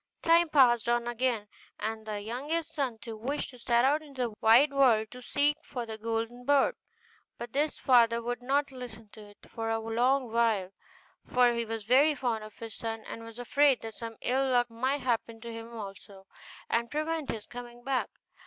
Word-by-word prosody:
Time 335 0 +5
passed 240 -6 +4
on 240 0 +1
again, 240 -3 -1 0.3
and 220 +1 -4
the 210 -1 -3
youngest 295 +10 -3
son 270 -7 -2
too 225 0 -8
wished 265 +8 -3
to 250 - -14
set 235 +1 +3
out 295 +3 +3
into 280 -4 -8
the 215 - -14
wide 250 +6 +6
world 235 -6 +4
to 250 - -10
seek 290 +4 +1
for 245 -2 -5
the 220 -1 -6
golden 230 +2 -3
bird; 280 +1 +3 0.6
but 235 0 -7
his 295 +2 0
father 235 -2 +4
would 245 +1 -4
not 280 +3 0
listen 230 -4 -9
to 215 - -13
it 205 0 -15
for 225 0 -4
a 225 - +1
long 240 +3 +1
while, 225 -5 +1 0.5
for 245 -1 +3
he 235 0 -1
was 225 -1 -4
very 275 +7 +4
fond 240 -4 -1
of 215 0 -12
his 225 -2 -7
son, 225 0 -4
and 230 - -7
was 230 0 -10
afraid 265 +2 +3
that 225 -1 -6
some 230 +1 -7
ill 265 +2 +1
luck 245 -2 +2
might 260 +5 -1
happen 230 -2 -1
to 230 0 -8
him 230 +1 -8
also, 195 -3 -9 0.4
and 235 0 0
prevent 310 0 -2
his 220 -2 -4
coming 240 0 -10
back. 265 -1 0
240 Hz, 195 wpm, -29 LUFS, 225-265 Hz, 0.6 s, wide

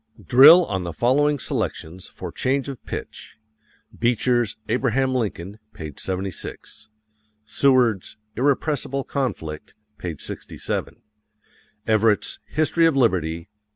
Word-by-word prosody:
Drill 155 +8 +8
on 95 - -3
the 85 -1 -5
following 145 - +2
selections 90 - -4
for - - -8
change 135 +1 -1
of 135 -3 -7
pitch: - - -7 0.6
Beecher's 120 -1 +1
"Abraham 130 +2 +1
Lincoln," 105 -4 -3 0.2
p. 75 -2 -7
76; 95 +3 -6 0.6
Seward's 125 -6 +2 0.2
"Irrepressible 140 +1 0
Conflict," 80 - -4 0.2
p. 85 -3 -4
67; - - -5 0.8
Everett's 110 -2 +2
"History 160 +2 +2
of 160 - +1
Liberty," 85 - +1
p. 85 - -20
120 Hz, 105 wpm, -23 LUFS, 95-135 Hz, 0.8 s, Drill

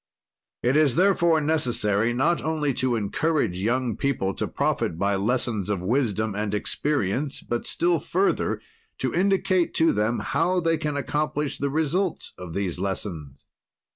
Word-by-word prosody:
"It 125 +3 +2
is, 150 -4 +4
therefore, 170 -3 +4
necessary, 120 -8 +1
not 135 +8 +1
only 150 -3 0
to 125 0 0
encourage 115 - 0
young 120 +3 0
people 115 -9 -1
to - - -3
profit 80 - -1
by 100 +3 +1
lessons 110 -1 -1
of 100 -4 -1
wisdom 110 -1 0
and 105 0 -2
experience, 135 +3 -1
but, 120 0 -3
still 170 -1 +2
further, 190 +6 0 0.4
to - - -2
indicate 185 -1 +2
to 165 0 +4
them 105 +3 +1
how 165 +8 +1
they 165 -2 +1
can 150 -2 -2
accomplish 150 0 -2
the 140 - 0
result 160 +5 -1
of 90 -3 -8
these 95 -3 -2
lessons. 85 -8 -4
130 Hz, 145 wpm, -25 LUFS, 105-160 Hz, 0.4 s, is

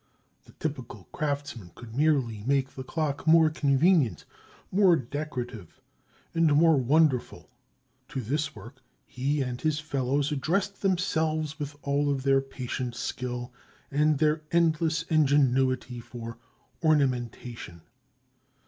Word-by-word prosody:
The - - -18
typical 130 -10 -5
craftsman 140 - -4
could 115 -1 -11
merely 135 -8 +1
make 135 -1 +1
the 130 - -7
clock 150 +1 -3
more 160 -1 +6
convenient, 145 - +2 0.5
more 190 -2 +5
decorative, 125 - -5 0.5
and 165 -2 +3
more 165 +1 +5
wonderful. 135 0 +1 0.6
To 135 - -5
this 145 +6 -2
work, 115 +6 -12 0.2
he 140 +3 -1
and 125 -1 -5
his 155 -1 0
fellows 140 -1 -1
addressed 190 +8 -1
themselves 160 -5 0
with 145 0 -5
all 145 +1 +1
of 135 -2 -1
their 135 0 +4
patient 130 -2 -5
skill 125 0 -4 0.4
and 150 +1 +3
their 155 +1 +2
endless 165 -1 +2
ingenuity 135 -5 +2
for 115 -1 -9 0.4
ornamentation. 125 - -1
140 Hz, 115 wpm, -27 LUFS, 125-155 Hz, 0.6 s, more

